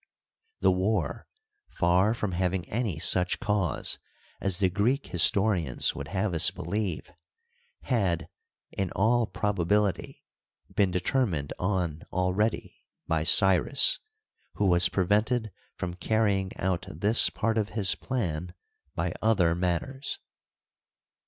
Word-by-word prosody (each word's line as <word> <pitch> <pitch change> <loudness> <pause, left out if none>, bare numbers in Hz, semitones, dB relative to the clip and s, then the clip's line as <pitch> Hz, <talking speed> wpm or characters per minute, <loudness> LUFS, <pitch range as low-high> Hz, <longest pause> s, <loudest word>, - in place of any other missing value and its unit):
The - - +4
war, 95 -3 -1 0.4
far 90 +6 +2
from 105 -4 -3
having 90 0 -2
any 110 -8 -2
such 90 +3 +2
cause 100 -6 0 0.4
as 95 -3 +1
the 95 - +3
Greek 120 +9 0
historians 90 - +3
would 70 - -7
have 95 +3 -2
us 80 - +5
believe, 95 -1 -4 0.7
had, 100 -10 0 0.4
in 95 -2 -3
all 115 +3 +2
probability, 105 -2 -1 0.5
been 100 -2 +3
determined 90 - -1
on 90 -5 -1
already 95 +5 -1 0.2
by 80 -1 0
Cyrus, 95 - +4 0.6
who 105 - 0
was 90 -1 +4
prevented 105 +4 0 0.2
from 90 -1 -4
carrying 95 0 0
out 95 0 -2
this 105 +4 +3
part 110 +1 -1
of 105 -1 -2
his 95 -3 +4
plan 90 -8 -4 0.4
by 85 +1 -2
other 100 -7 +3
matters. 90 +11 -2
95 Hz, 115 wpm, -27 LUFS, 90-105 Hz, 0.7 s, us